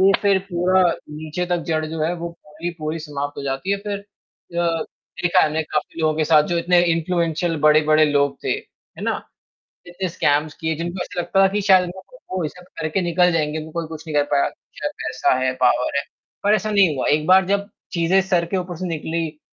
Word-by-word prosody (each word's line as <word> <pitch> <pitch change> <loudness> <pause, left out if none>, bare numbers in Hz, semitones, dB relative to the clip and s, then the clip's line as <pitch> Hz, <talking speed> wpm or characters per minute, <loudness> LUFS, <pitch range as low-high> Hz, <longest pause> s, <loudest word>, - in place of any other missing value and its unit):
ये 195 +1 +6
फ़िर 200 -2 +4
पूरा 180 +2 +3 0.3
नीचे 155 +3 -4
तक 175 0 0
जड़ 160 -2 0
जो 160 0 -5
है 165 +3 +1
वो 170 0 -4
पूरी 160 +1 -7
पूरी 155 +1 -3
समाप्त 145 -2 -5
हो 140 - -4
जाती 135 +7 -3
है 200 - 0
फ़िर 205 0 -4
अ, 170 -4 -4 0.4
देखा 175 - +4
है - - +4
हमने 155 +1 -1
काफ़ी 150 +1 -3
लोगों 155 -1 +2
के 155 - +2
साथ 155 -1 +5
जो 175 - +1
इतने 175 +1 +4
इन्फ्लुएंशल 165 0 0
बड़े-बड़े 155 0 +5
लोग 140 -1 +2
थे, - - 0
है - - -7
ना? - - -1 0.6
इतने 180 +1 -4
स्कैम्स 150 -2 +1
किए 160 0 0
जिनको 175 +3 -3
ऐसा 175 - -4
लगता 195 +2 +2
था 195 - +6
कि 210 - +1
शायद 190 -2 +5
मैं 190 - -12
वो 185 -2 -1
ये - - 0
सब 180 +4 -15 0.2
करके 160 +4 0
निकल 175 +1 +3
जाएँगे, 155 -1 0
वो 160 - -10
कोई 170 0 -3
कुछ 160 0 -9
नहीं 155 - -5
कर 145 - +4
पाया 140 -1 +3
अच्छा 150 - -6
पैसा 125 0 0
है, 130 0 +1
पावर 125 +2 +2
है। 140 - +2 0.4
पर 205 +1 +5
ऐसा 215 0 0
नहीं 195 -8 +4
हुआ - - -1
एक 150 +1 +2
बार 190 +1 +6
जब 200 +1 0 0.2
चीज़ें 175 +2 +3
सर 180 -2 +1
के 190 +3 -2
ऊपर 180 -1 -4
से 185 +3 -4
निकली, 160 -1 -3
165 Hz, 220 wpm, -21 LUFS, 155-180 Hz, 0.6 s, ये